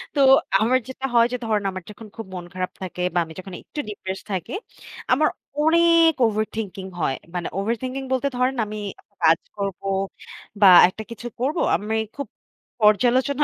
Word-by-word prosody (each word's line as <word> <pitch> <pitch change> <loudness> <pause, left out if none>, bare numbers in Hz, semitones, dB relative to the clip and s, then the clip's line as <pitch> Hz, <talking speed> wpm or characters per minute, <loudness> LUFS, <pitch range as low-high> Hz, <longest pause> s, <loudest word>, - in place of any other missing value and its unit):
তো - - 0 0.4
আমার 245 +4 +4
যেটা 260 +1 -6
হয় 235 -1 +6
যে - - 0
ধরেন 215 -2 0
আমার 185 -1 -7
যখন 215 +1 -11
খুব 225 - -7
মন 175 -1 -6
খারাপ 185 0 -3
থাকে 180 -1 -5
বা - - -1
আমি 160 - -11
যখন 190 0 -9
একটু 300 - -9
ডিপ্রেসড 190 -2 -6
থাকি, 185 -3 -3 0.6
আমার 300 +5 +4 0.3
অনেক 335 +1 +5
ওভার 215 -1 +1
থিংকিং 195 -3 -5 0.2
হয়। 135 -3 +1 0.2
মানে 175 - -2
ওভার 210 +4 0
থিংকিং 260 +1 -4
বলতে 260 +1 +1
ধরেন 255 +2 +1
আমি 210 0 -6 0.4
কাজ 165 0 +5 0.2
করবো 195 -1 -4 0.8
বা 200 - +9 0.2
একটা 210 +4 -7
কিছু 230 +1 -7
করবো। 285 +7 0
আমি 215 +2 -2 0.2
খুব 280 -3 -5 0.6
পর্যালোচনা 255 +6 +3
220 Hz, 170 wpm, -23 LUFS, 190-260 Hz, 0.8 s, বা